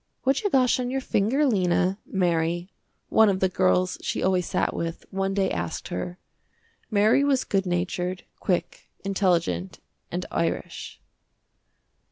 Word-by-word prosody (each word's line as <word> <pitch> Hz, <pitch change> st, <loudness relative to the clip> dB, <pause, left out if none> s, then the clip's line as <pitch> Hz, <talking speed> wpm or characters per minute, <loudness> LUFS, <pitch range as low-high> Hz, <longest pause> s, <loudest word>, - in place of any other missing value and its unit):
"What 270 Hz, +1 st, +2 dB
you 410 Hz, -, 0 dB
got 255 Hz, -5 st, +3 dB
on 250 Hz, -1 st, -1 dB
your 270 Hz, +1 st, -1 dB
finger 260 Hz, +4 st, +1 dB
Lena," 185 Hz, -4 st, +2 dB
Mary, 175 Hz, -1 st, 0 dB, 0.4 s
one 220 Hz, -1 st, +5 dB
of 190 Hz, -1 st, +1 dB
the 190 Hz, -, +3 dB
girls 185 Hz, 0 st, +2 dB
she -, -, -2 dB
always 185 Hz, -2 st, +2 dB
sat -, -, 0 dB
with, 165 Hz, 0 st, -4 dB
one 195 Hz, 0 st, -1 dB
day 195 Hz, -1 st, +1 dB
asked 85 Hz, -1 st, -3 dB
her. 175 Hz, -, -4 dB, 0.7 s
Mary 215 Hz, +5 st, +4 dB
was 275 Hz, -2 st, +2 dB
good 195 Hz, -1 st, 0 dB
natured, 180 Hz, +1 st, -2 dB, 0.2 s
quick, 180 Hz, -2 st, -2 dB
intelligent 175 Hz, -, 0 dB, 0.3 s
and -, -, -3 dB
Irish. -, -, -3 dB
190 Hz, 140 wpm, -25 LUFS, 175-215 Hz, 0.7 s, one